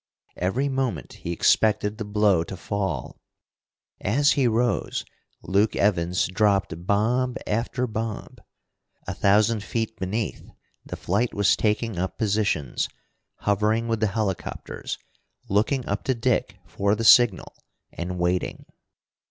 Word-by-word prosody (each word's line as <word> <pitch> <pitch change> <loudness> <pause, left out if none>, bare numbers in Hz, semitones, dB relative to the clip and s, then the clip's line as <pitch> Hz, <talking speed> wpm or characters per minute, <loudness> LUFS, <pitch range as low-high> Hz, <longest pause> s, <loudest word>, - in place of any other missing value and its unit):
Every 95 +11 0
moment 135 -3 -2
he 85 - -6
expected 105 +4 +2
the 110 - -3
blow 105 -4 +3
to 95 - -7
fall. 100 -1 -3 0.8
As 145 +8 +3
he 135 -3 +3
rose, 120 +1 0 0.4
Luke 100 +3 +2
Evans 90 -3 +2
dropped 95 -3 0
bomb 120 +5 +1
after 120 +4 -1
bomb. 110 -2 -5 0.7
A - - -3
thousand 105 +2 +3
feet 110 0 -3
beneath 100 +4 -3 0.3
the - - -6
flight 105 +7 0
was 100 -1 +4
taking 105 -2 0
up 95 +1 -3
positions, 100 - 0 0.5
hovering 105 +3 +1
with 115 -1 0
the 110 - +2
helicopters, 100 -3 -3 0.5
looking 115 +6 +1
up 100 +1 -2
to 130 - +1
Dick 120 +1 0
for 100 +1 0
the 115 - -3
signal, 115 -4 +5 0.4
and 90 +1 -4
waiting. 90 +1 -1
105 Hz, 125 wpm, -25 LUFS, 95-115 Hz, 0.8 s, signal